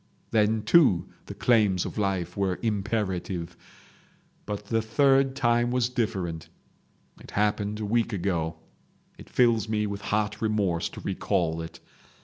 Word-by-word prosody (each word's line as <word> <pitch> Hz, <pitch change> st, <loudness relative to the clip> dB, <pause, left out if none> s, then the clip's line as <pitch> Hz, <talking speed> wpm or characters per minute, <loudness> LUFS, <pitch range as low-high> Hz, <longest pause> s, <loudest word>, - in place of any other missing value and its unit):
Then, 110 Hz, 0 st, +2 dB
too, 110 Hz, -, +4 dB, 0.2 s
the -, -, -7 dB
claims 105 Hz, -7 st, +3 dB
of -, -, -6 dB
life 95 Hz, -4 st, -1 dB
were 95 Hz, -2 st, 0 dB
imperative. 95 Hz, -5 st, -2 dB, 0.9 s
But 105 Hz, 0 st, -4 dB
the 115 Hz, +1 st, 0 dB
third 135 Hz, +4 st, +3 dB
time 120 Hz, -2 st, +2 dB
was 125 Hz, -1 st, +1 dB
different; 95 Hz, -9 st, -3 dB, 0.7 s
it -, -, -14 dB
happened 105 Hz, 0 st, 0 dB
a 110 Hz, -, -3 dB
week 115 Hz, +2 st, +1 dB
ago. 85 Hz, -5 st, -1 dB, 0.6 s
It -, -, -12 dB
fills 115 Hz, -3 st, +2 dB
me 105 Hz, -1 st, 0 dB
with 100 Hz, -1 st, -4 dB
hot 105 Hz, 0 st, -1 dB
remorse 100 Hz, -6 st, 0 dB
to -, -, -10 dB
recall 85 Hz, -4 st, -1 dB
it. 80 Hz, +1 st, -9 dB
105 Hz, 135 wpm, -27 LUFS, 95-115 Hz, 0.9 s, too